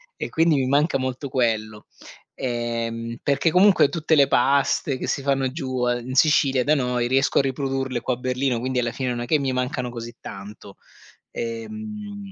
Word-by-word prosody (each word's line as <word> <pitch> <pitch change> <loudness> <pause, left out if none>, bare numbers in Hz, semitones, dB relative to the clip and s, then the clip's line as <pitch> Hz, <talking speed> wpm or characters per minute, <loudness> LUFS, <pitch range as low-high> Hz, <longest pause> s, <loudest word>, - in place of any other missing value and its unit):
e - - -5
quindi 165 0 +3
mi 130 -1 0
manca 140 +1 +2
molto 130 +1 -4
quello, 110 -4 -1 0.5
ehm, 115 -1 -3
perché 140 +4 +2
comunque 180 -4 +5
tutte 160 +1 -1
le 140 -3 +6
paste 135 +1 +2
che - - -4
si 140 - -2
fanno 135 -2 +1
giù, 130 -4 -2
in 120 +1 -2
Sicilia 135 -2 +3
da 150 +4 +3
noi, 125 -3 0
riesco 135 +1 +2
a - - +6
riprodurle 135 -2 -2
qua 130 - -1
a 120 - -5
Berlino, 125 -1 -1
quindi 130 +1 -2
alla 120 -1 0
fine 130 0 -3
non 120 -1 -2
è - - -3
che 150 +5 +2
mi 135 -2 -1
mancano 125 0 -2
così 120 -1 -8
tanto. 100 0 -10 0.6
Ehm, 205 - -6
130 Hz, 180 wpm, -23 LUFS, 120-140 Hz, 0.6 s, le